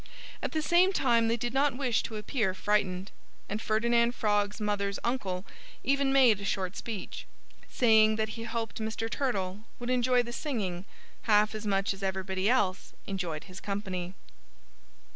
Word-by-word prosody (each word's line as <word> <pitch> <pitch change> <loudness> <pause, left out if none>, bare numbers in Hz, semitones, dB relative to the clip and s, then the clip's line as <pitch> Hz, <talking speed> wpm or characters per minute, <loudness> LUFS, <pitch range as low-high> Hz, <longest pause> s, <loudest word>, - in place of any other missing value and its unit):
At - - -2
the 315 -1 0
same 350 +4 +5
time 235 -8 +3
they 230 +1 +1
did 240 +1 -3
not 275 -1 +2
wish 250 -5 +1
to 220 - -6
appear 210 -3 -1
frightened. 190 -2 0 0.4
And 210 +2 -3
Ferdinand 235 +2 +2
Frog's 205 0 +1
mother's 200 -1 -1
uncle 200 -7 -2 0.4
even 275 0 +2
made 250 -7 +5
a - - -6
short 190 -1 -2
speech, 220 -5 -6 0.4
saying 220 -3 +5
that 220 0 -1
he 230 +1 -6
hoped 230 -1 -4
Mr. 220 +1 -2
Turtle 210 -6 -2
would 245 +1 -3
enjoy 250 0 +3
the 240 0 -7
singing 195 - -3 0.4
half 210 0 +5
as 215 0 -5
much 195 0 +1
as 195 - -12
everybody 190 +1 -1
else 195 -7 +1
enjoyed 180 -6 -3
his 185 0 -10
company. 190 -3 -4
215 Hz, 160 wpm, -29 LUFS, 195-240 Hz, 0.4 s, same